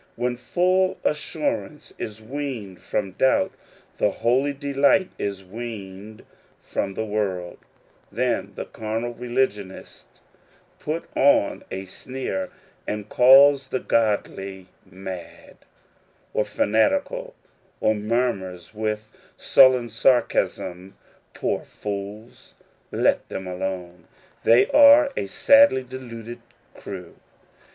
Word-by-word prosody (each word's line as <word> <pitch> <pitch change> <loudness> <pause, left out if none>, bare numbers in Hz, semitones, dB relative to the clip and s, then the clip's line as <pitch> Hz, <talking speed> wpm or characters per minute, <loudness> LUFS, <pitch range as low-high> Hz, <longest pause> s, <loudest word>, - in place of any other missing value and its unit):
When 120 +1 -1
full 185 +7 +1
assurance 155 - -3
is 110 0 -6
weaned 120 -7 -6
from 100 -2 -2
doubt, 130 +8 +2 0.5
and - - +3
holy 130 +5 +1
delight 140 +6 +2
is 100 -1 -3
weaned 105 -1 -8 0.3
from 95 -1 -4
the 110 - -2
world, 95 -5 -3 0.5
then 115 -3 -1
the - - -5
carnal 115 +2 -4
religion 120 -5 -1
ist 95 - -13 0.7
puts 160 +3 -3
on 135 -7 +3
a 95 +1 -5
sneer, 95 -1 -5 0.4
and 105 0 -4
calls 135 +2 +6
the 130 - -2
godly 100 -5 -1 0.2
mad, 95 -1 -9 0.8
of - - 0
fanatical, 290 - 0 0.4
or 110 - +3
murmurs 105 -5 -2
with 110 0 -3 0.3
sullen 130 -3 +5
sarcasm, 110 -6 0 0.2
" - - -36
Poor - - -1
fools! 105 +3 -8 0.3
let - - +1
them 95 - -5
alone; 90 -2 -5 0.4
they 115 +2 +6
are 290 0 +7
a - - -2
sadly 280 - +5
deluded 120 -2 -9 0.3
crew." 90 -3 -9
115 Hz, 105 wpm, -23 LUFS, 100-130 Hz, 0.8 s, are